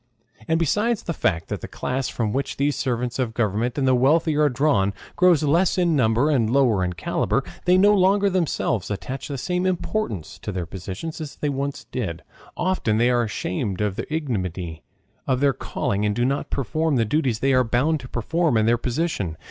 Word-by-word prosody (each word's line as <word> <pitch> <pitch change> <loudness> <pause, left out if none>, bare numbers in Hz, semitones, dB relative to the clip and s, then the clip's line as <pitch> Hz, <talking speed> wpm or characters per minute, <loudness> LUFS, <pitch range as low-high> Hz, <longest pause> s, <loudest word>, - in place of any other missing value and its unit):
And 160 - +2
besides 210 - +1
the 170 - -3
fact 80 - 0
that - - -4
the - - -6
class 130 +1 -3
from 110 -3 -2
which 135 +1 -2
the 140 +1 +2
servants 125 -2 -2
of 115 -4 -1
government 115 +3 0
and 135 -2 +1
the 130 - +5
wealthy 150 +5 +3
are 150 0 +4
drawn 125 -7 +1 0.2
grows 175 -4 +4
less 165 +6 +2
in 175 -3 +2
number 125 +3 +3
and 120 -7 +2
lower 120 -7 +3
in 90 0 -1
caliber, 85 - -1 0.2
they 180 +1 +5
no 205 +2 +6
longer 200 +1 +4
themselves 170 - 0
attach 125 +6 -5
the 140 - -4
same 180 +6 -1
importance 180 - -3
to 105 - -5
their 90 -3 -3
positions 95 - -6
as 150 -2 -6
they 150 - -2
once 140 0 -3
did; 95 -10 -5 0.3
often 175 -12 0
they 120 +2 +3
are 120 -1 +3
ashamed 100 -3 -3
of 105 -2 0
the - - -6
ignominy 95 - -3 0.5
of 130 -2 +1
their 140 0 +3
calling 100 -2 -2
and 105 -1 +1
do 120 - +1
not 140 +2 -1
perform 155 +3 0
the 115 -3 +2
duties 130 -1 0
they 135 +4 +1
are 130 0 +4
bound 135 +7 +1
to 125 -1 -10
perform 155 +3 0
in 110 - +3
their 120 +1 +3
position. 120 - -2
130 Hz, 200 wpm, -23 LUFS, 110-155 Hz, 0.5 s, no